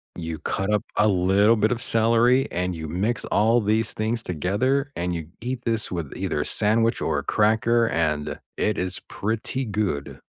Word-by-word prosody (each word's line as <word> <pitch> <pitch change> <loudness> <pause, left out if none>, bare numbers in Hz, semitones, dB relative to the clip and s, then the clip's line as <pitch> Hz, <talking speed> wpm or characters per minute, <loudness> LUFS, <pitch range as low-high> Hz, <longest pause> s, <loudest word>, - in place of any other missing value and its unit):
You 80 -2 -5
cut 95 +2 -2
up 105 - +1
a 105 - +4
little 100 +4 +4
bit 110 +2 +1
of 120 - -1
celery, 115 +3 +3
and 90 +1 -2
you 80 -1 -6
mix 100 +9 -1
all 115 +3 +3
these 110 +2 0
things 115 +2 -1
together, 125 - 0
and 90 +1 -2
you 85 - -4
ge 75 - -18
eat 125 +1 -4
this 115 -2 +1
with 85 -6 -4
either - - -2
a - - -3
sandwich 115 +2 +2
or 75 -2 0
a - - -6
cracker, 115 +2 +2
and 75 -7 -1 0.2
it 105 -2 0
is 90 -1 -2
pretty 110 +5 -3
good. 100 - -3
105 Hz, 185 wpm, -24 LUFS, 90-115 Hz, 0.2 s, a